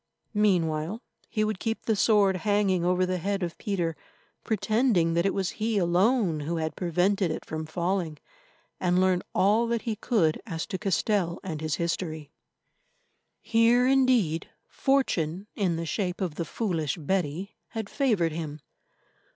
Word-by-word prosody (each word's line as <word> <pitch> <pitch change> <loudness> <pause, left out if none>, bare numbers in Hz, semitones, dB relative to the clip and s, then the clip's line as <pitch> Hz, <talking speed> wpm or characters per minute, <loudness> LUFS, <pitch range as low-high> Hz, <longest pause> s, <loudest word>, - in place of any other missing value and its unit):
Meanwhile, 180 -3 +1 0.3
he 215 - 0
would 215 -3 -1
keep 225 -1 -3
the 220 - +2
sword 200 -2 +4
hanging 200 -2 +1
over 180 +1 +2
the 185 0 -1
head 195 +2 -1
of 170 -1 -3
Peter, 175 -7 -1 0.5
pretending 215 -5 +2
that 170 +3 +2
it - - 0
was 195 -2 -1
he 220 -1 +1
alone 185 0 +2
who 155 +3 -3
had 160 -1 -2
prevented 180 +2 +1
it 155 - -4
from 155 0 -5
falling, 170 -1 -1 0.6
and 180 0 +2
learn 185 -1 +3
all 215 +5 +3
that 235 -1 -1
he 225 -3 -2
could 205 -8 +1
as 165 -5 -3
to 185 - -5
Castell 195 -2 0
and 160 -5 -5
his 155 -1 -1
history. 160 -3 -3 1.1
Here, 230 +2 +4
indeed, 255 - +2 0.2
Fortune, 195 - 0
in 185 -6 +1
the 165 +1 -3
shape 180 +1 -2
of 185 -6 -2
the 165 +2 -3
foolish 165 - -2
Betty, 175 +2 -2
had 220 -2 -5
favoured 210 - +1
him. 155 -1 -5
185 Hz, 150 wpm, -27 LUFS, 165-215 Hz, 1.1 s, sword